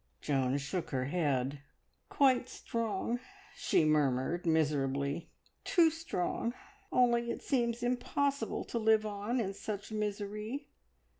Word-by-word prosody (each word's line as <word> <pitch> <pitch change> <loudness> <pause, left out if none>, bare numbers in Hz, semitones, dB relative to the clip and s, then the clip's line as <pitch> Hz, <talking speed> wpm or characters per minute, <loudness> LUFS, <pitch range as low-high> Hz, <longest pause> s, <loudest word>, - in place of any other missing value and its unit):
Joan 135 -2 +1
shook 145 +5 -3
her 130 -2 -1
head. 140 -3 0 0.5
"Quite 260 -3 +3
strong," 230 +1 -2 0.4
she 155 - +2
murmured 150 +3 +2
miserably; 145 -1 +1 0.3
"too 335 -3 +5
strong. 245 - -2 0.4
Only 235 -1 +3
it - - -4
seems 240 -3 0
impossible 250 +1 0
to 235 - -3
live 220 -1 +4
on 210 +4 -2
in 195 -4 -1
such 205 +1 -5
misery. 210 +5 -3
210 Hz, 115 wpm, -33 LUFS, 150-240 Hz, 0.5 s, too